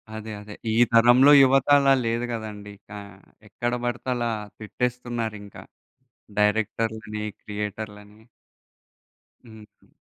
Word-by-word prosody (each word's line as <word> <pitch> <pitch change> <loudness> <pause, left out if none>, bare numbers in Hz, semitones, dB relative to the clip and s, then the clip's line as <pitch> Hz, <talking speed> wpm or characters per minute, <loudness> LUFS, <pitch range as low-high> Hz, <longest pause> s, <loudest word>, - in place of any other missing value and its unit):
అదే. 110 0 -7
అదే. 105 0 -11 0.2
ఈ - - 0 0.2
తరంలో 120 +4 +6
యువత 135 0 +3
అలా 140 -1 +4
లేదు 115 +1 -1
గదండీ! 105 -2 -7
ఇంకా 105 0 -11 0.5
ఎక్కడ 120 +3 -3
బడితే 120 +1 -3
అలా 120 -1 -1 0.3
తిట్టేస్తున్నారింక. 115 -2 -4 0.8
డైరెక్టర్‌లని, 110 0 -1 0.2
క్రియేటర్‌లని. 105 0 -7 1.2
హుహు. 110 -2 -17
110 Hz, 95 wpm, -24 LUFS, 105-120 Hz, 1.2 s, తరంలో